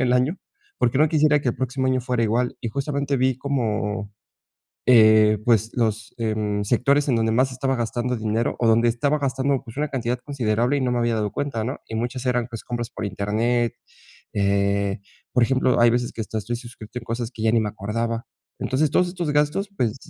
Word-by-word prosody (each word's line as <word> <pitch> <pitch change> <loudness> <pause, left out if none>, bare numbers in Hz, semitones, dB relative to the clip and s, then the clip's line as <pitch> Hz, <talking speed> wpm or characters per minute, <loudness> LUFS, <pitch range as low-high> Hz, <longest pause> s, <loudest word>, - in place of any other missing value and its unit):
el 125 -1 +2
año 130 +9 +1 0.4
porque, 120 +3 +1
no 155 0 +5
quisiera 150 -1 +3
que 130 - -1
el - - -6
próximo 130 +1 -1
año 130 0 +2
fuera 125 -2 0
igual. 120 +3 0
Y 115 - -3
justamente 140 +3 -1
vi 130 0 +1
como, 110 -6 -2 0.7
eh, 110 -3 +6
pues, 115 -2 +3
los, 110 -2 -1
eh, 110 -2 0
mm, 105 -1 -1
sectores 140 +7 +2
en 125 - +3
donde 115 -1 +1
más 130 +4 +2
estaba 135 +1 -1
gastando 120 +1 -1
dinero, 110 +1 -1
o 120 - +1
donde 115 +1 +4
estaba 140 +6 +1
gastando, 135 0 0
pues, 115 0 -11
una 150 +1 0
cantidad 125 -2 -2
considerable 125 -1 0
y - - 0
no 130 -1 0
me 125 - 0
había 120 -1 +1
dado 105 -2 -1
cuenta, 135 -4 -3
¿no? 130 +5 -3
Y 110 - -7
muchas 120 +3 -3
eran, 125 -1 +1
pues, 115 -3 -8
compras 120 -1 -4
por - - -6
internet, 110 +4 0 0.6
eh, 100 0 +1 0.3
por 125 -1 +4
ejemplo, 130 0 +2
hay 120 0 +6
veces 120 +1 0
que 115 - -7
hasta 110 - -4
estoy 115 +3 -3
suscrito 120 -1 -9
a - - -10
cosas 115 0 -4
que 115 - -12
ya 110 0 +3
ni 115 - +4
me 105 - -1
acordaba. 115 +3 -3 0.3
Entonces 140 +3 +1
todos 180 +5 +3
estos 175 -3 -3
gastos, 150 +7 +1
pues, 115 - 0
120 Hz, 210 wpm, -23 LUFS, 110-130 Hz, 0.7 s, eh